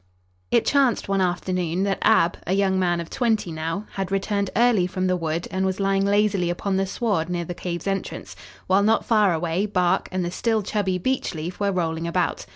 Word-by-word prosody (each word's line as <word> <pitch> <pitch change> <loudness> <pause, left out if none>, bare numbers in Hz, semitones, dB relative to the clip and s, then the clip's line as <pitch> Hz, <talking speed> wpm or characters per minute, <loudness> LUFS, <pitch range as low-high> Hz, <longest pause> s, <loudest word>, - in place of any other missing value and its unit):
It 235 - +2
chanced 275 -5 +2
one 195 -1 +1
afternoon 180 -1 -1
that 195 -1 0
Ab, 175 -6 +4
a 185 - +1
young 190 -1 +2
man 175 -2 +1
of 170 - -7
twenty 225 -7 0
now, 165 +6 -3
had 195 -1 -3
returned 200 0 0
early 230 -6 +3
from 185 0 -2
the 185 0 +2
wood 165 0 -2
and 190 0 -1
was 190 0 -1
lying 195 0 +1
lazily 200 -3 +2
upon 190 +3 -1
the 195 0 0
sward 195 -5 -1
near 175 -1 -2
the 175 - -5
cave's 175 -1 -5
entrance, 195 -1 -4 0.3
while, 190 +2 +3
not 220 +2 +2
far 215 -5 +3
away, 170 +4 -1
Bark 180 -3 +1
and 185 -1 -1
the 175 - -3
still 220 +2 0
chubby 195 -2 -1
Beechleaf 180 -6 -3
were 200 -1 +1
rolling 165 -2 -2
about. 175 0 -1
190 Hz, 200 wpm, -23 LUFS, 175-200 Hz, 0.3 s, Ab